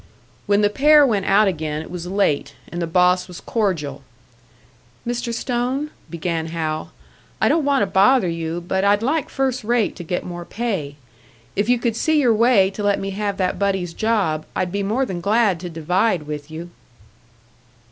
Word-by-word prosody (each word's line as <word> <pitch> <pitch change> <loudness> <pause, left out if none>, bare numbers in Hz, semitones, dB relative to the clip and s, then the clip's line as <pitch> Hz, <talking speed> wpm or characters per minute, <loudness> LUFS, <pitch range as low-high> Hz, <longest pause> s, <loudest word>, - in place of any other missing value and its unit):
When 205 0 +3
the 205 - +4
pair 295 +4 +6
went 205 -7 0
out 205 +2 +5
again, 155 -4 -2
it - - -12
was 175 -1 -6
late, 150 -7 0 0.2
and 175 - -4
the 170 - -1
boss 180 +2 +3
was 180 -2 -9
cordial. 185 -10 -2 1.0
"Mr. 240 0 -2
Stone," 250 +5 -2 0.2
began 165 0 -3
Hal, 160 -1 -3 0.5
"I - - +3
don't 325 - +2
want 280 -4 +3
to - - +2
bother 195 +3 +4
you, 165 0 -3
but 190 0 0
I'd 205 +2 +3
like 300 +4 0
first 265 -2 -1
rate 235 0 +1
to 175 - -6
get 180 +2 -3
more 175 -1 -6
pay. 190 -9 -3 0.6
If 205 +3 0
you 245 - +4
could 235 -2 -1
see 315 +6 +2
your 245 -5 +4
way 220 -4 +4
to 200 - -6
let 205 -1 +1
me 195 0 -4
have 200 0 -2
that 185 -1 -1
buddy's 190 -4 -1
job, 200 -9 0
I'd 180 - -1
be 200 +1 -1
more 220 +7 0
than 180 -6 -5
glad 205 -2 +2
to 175 +1 -6
divide 175 +3 0
with 150 0 -6
you." 165 +2 -8
195 Hz, 185 wpm, -21 LUFS, 170-230 Hz, 1.0 s, pair